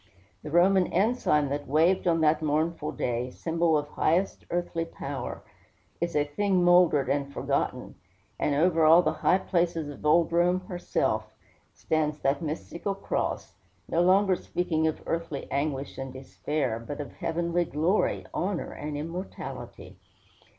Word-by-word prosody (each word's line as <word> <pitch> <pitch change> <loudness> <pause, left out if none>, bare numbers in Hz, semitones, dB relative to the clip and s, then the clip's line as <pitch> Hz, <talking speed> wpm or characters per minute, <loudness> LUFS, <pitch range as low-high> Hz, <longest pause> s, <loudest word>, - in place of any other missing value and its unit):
The 150 - -7
Roman 180 +3 +4
ensign 185 - +1
that 145 +1 -3
waved 165 +7 +3
on 165 -1 +3
that 155 0 +3
mournful 155 +2 -1
day, 125 +1 -2
symbol 165 +3 +1
of 145 0 -3
highest 175 +5 0
earthly 175 -1 -1
power, 165 - -6 0.6
is 170 -1 -1
a 145 - +3
thing 185 +5 +1
mouldered 175 -6 +5
and 140 +1 -1
forgotten; - - -2 0.5
and 145 - +1
over 165 +2 +3
all 165 +3 +7
the 155 - +1
high 180 - +3
places 170 -4 -1
of 145 - -10
old 165 +2 +4
Rome, 175 +2 +2
herself, 180 -1 -2 0.4
stands 155 -1 -1
that 140 +1 +1
mystical 170 +5 -4
cross, 195 - -3 0.3
no 165 - +1
longer 190 +1 +4
speaking 160 -3 -1
of 155 - -3
earthly 165 -4 -3
anguish 140 0 -2
and 135 0 -5
despair, 130 -1 -3
but 145 +6 -7
of 145 - -5
heavenly 170 +1 0
glory, 165 +7 0
honor, 185 -1 -2
and 150 0 -5
immortality. 165 +5 -7
165 Hz, 145 wpm, -27 LUFS, 145-175 Hz, 0.6 s, all